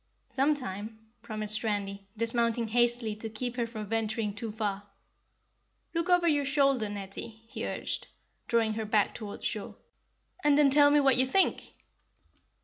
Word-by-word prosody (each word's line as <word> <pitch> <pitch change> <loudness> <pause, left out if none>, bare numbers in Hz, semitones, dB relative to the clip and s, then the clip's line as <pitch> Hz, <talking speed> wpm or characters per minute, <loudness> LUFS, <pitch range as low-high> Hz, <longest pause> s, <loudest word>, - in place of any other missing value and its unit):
"Some 280 +3 +2
time," 215 -3 -6 0.2
promised 215 0 -3
Randy, 200 -2 -2
dismounting 230 0 +1
hastily 240 -1 +2
to 225 +1 -5
keep 240 +3 -4
her 240 -2 -1
from 220 -2 -6
venturing 220 0 -1
too 215 +2 -5
far. 205 -2 -3 1.1
"Look 335 +1 -1
over 355 -1 +4
your 290 -3 +3
shoulder, 275 -5 +2
Netty," 205 +2 -7
he - - -4
urged, - - -4 0.4
drawing 225 -2 +2
her 220 0 -3
back 210 -1 +2
toward 210 -3 -7
shore, - - -3 0.7
"and 290 -1 +5
then 290 -2 +5
tell 285 +1 +7
me 295 0 +5
what 270 -3 +4
you 260 +1 +3
think!" 385 +8 +1
230 Hz, 150 wpm, -29 LUFS, 215-270 Hz, 1.1 s, tell